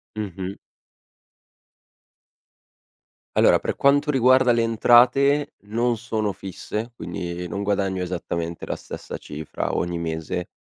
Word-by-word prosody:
Mh-mh. 95 -2 -5 2.8
Allora - - +5
per - - -3
quanto 145 +2 +3
riguarda 130 -1 +5
le 120 -1 +3
entrate 125 +5 +4
non 120 +2 0
sono 110 -2 -2
fisse, 105 +4 -6
quindi 85 -1 -5
non 100 +3 -4
guadagno 100 -2 0
esattamente 85 -2 -4
la - - -3
stessa - - -8
cifra 75 +1 -5
ogni 85 0 -1
mese 80 +1 -3
105 Hz, 105 wpm, -23 LUFS, 90-120 Hz, 2.8 s, Allora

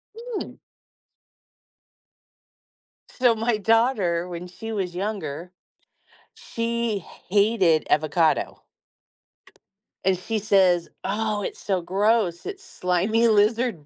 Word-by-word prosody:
Mm. 465 -1 -6 2.5
So 245 -3 +2
my 225 0 0
daughter, 210 -6 +2
when 175 0 -7
she 225 +5 -8
was 185 -4 -3
younger, 180 -5 -4 0.8
she 230 -2 -2
hated 195 -3 +1
avocado. 155 +2 +1 1.4
And 190 - +3
she 220 +5 -3
says, 190 -5 +3
"Oh, 210 0 -1
it's - - -5
so 190 -3 -1
gross. 195 -1 +1
It's 400 -1 -7
slimy 195 +6 +1
lizard 215 - +2
205 Hz, 90 wpm, -24 LUFS, 180-225 Hz, 2.5 s, And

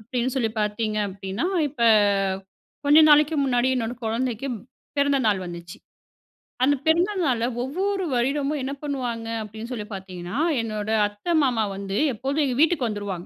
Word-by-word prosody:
அப்பிடின்னு 245 +3 -2
சொல்லி 230 -4 +1
பார்த்தீங்க 215 +1 -1
அப்பிடின்னா, 195 - -4 0.2
இப்ப 260 -4 -5 1.0
கொஞ்ச 290 +2 +6
நாளைக்கு 300 +1 +5
முன்னாடி 250 -1 +2
என்னோட 235 -1 -2
குழந்தைக்கு 235 +2 -2 0.5
பிறந்த 280 0 +3
நாள் 205 -3 +2
வந்துச்சு. 175 0 -8 0.9
அந்த 285 +2 +4
பிறந்த 340 +5 +3
நாள்ல 240 -6 +1 0.2
ஒவ்வொரு 380 +9 -1
வருடமும் 275 +4 0
என்ன 270 - -3
பண்ணுவாங்க 245 -6 -3
அப்பிடின்னு 220 +3 -8
சொல்லி 210 -4 -5
பார்த்தீங்கன்னா, 185 +1 -6 0.2
என்னோட 215 -2 -4 0.2
அத்த, 205 +7 -14 0.2
மாமா 245 -5 +1
வந்து 195 0 -4 0.2
எப்போதும் 275 +7 -1
எங்க 255 - -1
வீட்டுக்கு 315 -6 +3
வந்துருவாங்க. 200 -4 -5
240 Hz, 140 wpm, -24 LUFS, 210-280 Hz, 1.0 s, கொஞ்ச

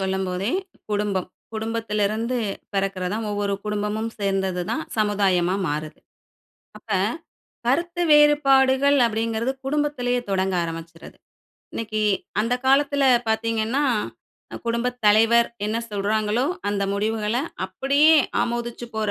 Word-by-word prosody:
சொல்லும்போதே 190 +2 -1 0.4
குடும்பம். 205 -3 -1 0.3
குடும்பத்திலிருந்து 220 +1 -1 0.4
பிறக்குறது 195 -1 -1
தான். 225 0 -3
ஒவ்வொரு 205 -1 -1
குடும்பமும் 210 +2 -2
சேர்ந்தது 190 -3 -1
தான் 315 - -1 0.2
சமுதாயமா 195 -4 +2
மாறுது. 155 +1 -4 0.8
அப்ப - - -17 0.8
கருத்து 340 +7 0
வேறுபாடுகள் 280 -2 +5
அப்டீங்கிறது 225 +2 -1
குடும்பத்திலேயே 270 -4 0
தொடங்க 190 -1 0
ஆரம்பிச்சுருது. 165 0 -8 0.6
இன்னைக்கு 215 -1 -3 0.4
அந்த 230 +3 +1
காலத்துல 280 +1 +3 0.3
பாத்தீங்கன்னா, 225 +4 0 0.8
குடும்பத் 235 +2 -1
தலைவர் 225 +3 +5 0.2
என்ன 215 +2 -1
சொல்றாங்களோ, 210 +3 0 0.2
அந்த 200 -1 -1
முடிவுகள்ல 215 +2 -1 0.3
அப்பிடியே 280 +11 +4 0.2
ஆமோதிச்சுப் 240 0 -3
போற 215 -1 -1
220 Hz, 95 wpm, -23 LUFS, 200-245 Hz, 0.8 s, வேறுபாடுகள்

